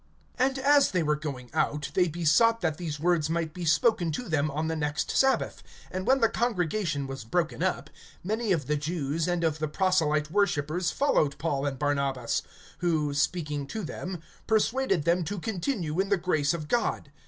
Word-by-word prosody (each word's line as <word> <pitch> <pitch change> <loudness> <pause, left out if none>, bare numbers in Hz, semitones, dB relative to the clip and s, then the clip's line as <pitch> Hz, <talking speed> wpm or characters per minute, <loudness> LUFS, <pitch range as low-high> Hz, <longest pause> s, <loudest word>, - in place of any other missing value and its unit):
(42)And 265 +1 +2
as 280 +1 +4
they 180 -3 0
were 150 0 +2
going 135 -5 -6
out, 150 -1 0
they 180 -1 +3
besought 175 +8 +3
that 160 -4 0
these 155 -4 -4
words 165 -2 +1
might 165 -1 -1
be 175 0 -5
spoken 170 +3 +3
to 245 +9 -4
them 155 -3 +1
on 155 +3 -2
the 160 - -1
next 150 -1 -1
sabbath. 265 0 +2 0.3
(43)And 185 0 -3
when 265 0 +3
the 225 - +6
congregation 180 - -1
was 135 -2 -6
broken 160 +8 -1
up, 185 0 -1 0.3
many 215 +3 -1
of 160 -7 +1
the 150 +3 0
Jews 155 +1 -2
and 175 -1 0
of 160 -1 0
the 155 - -1
proselyte 155 -3 +1
worshipers 175 -3 +1
followed 155 - +1
Paul 145 -2 -1
and 135 -2 -3
Barnabas; 140 -4 0 0.4
who, 155 -5 0
speaking 145 -1 -1
to 220 +7 -5
them, 180 +2 -5 0.3
persuaded 220 - +2
them 170 +2 +2
to 200 +6 -4
continue 180 - -2
in 195 0 +1
the 200 - +3
grace 165 -3 +1
of 155 -3 -6
God. 230 -9 -1
165 Hz, 185 wpm, -28 LUFS, 150-190 Hz, 0.4 s, the